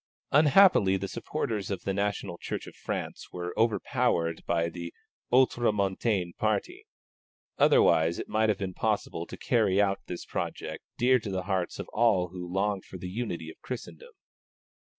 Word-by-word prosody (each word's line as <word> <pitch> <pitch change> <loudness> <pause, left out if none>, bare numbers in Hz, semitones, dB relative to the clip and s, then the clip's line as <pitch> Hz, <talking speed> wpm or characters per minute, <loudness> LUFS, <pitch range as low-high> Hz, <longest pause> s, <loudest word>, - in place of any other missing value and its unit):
Unhappily 145 - +6
the 100 +1 -4
supporters 105 0 -3
of 95 -3 -3
the 95 - -1
National 100 -3 -2
Church - - -4
of - - -12
France - - -5
were 90 0 -5
overpowered 110 -6 +1
by 85 -1 +1
the 85 0 -6 0.4
Ultramontane 105 -6 +2
party; - - -1 0.7
otherwise 80 +1 +4
it - - -5
might 110 +1 +2
have 105 - +2
been 95 -2 -4
possible 100 -5 -1
to - - -8
carry 105 -6 +2
out 100 -1 +2
this 90 - -6
project - - -4
dear 125 +1 +4
to 105 - -6
the 95 -1 -2
hearts 95 -2 -2
of - - -6
all 105 -6 +2
who 90 -1 -7
long 100 +1 0
for 95 - -10
the 90 0 -6
unity 90 -7 -4
of - - -19
Christendom. 465 - -8
100 Hz, 155 wpm, -28 LUFS, 90-115 Hz, 0.7 s, Unhappily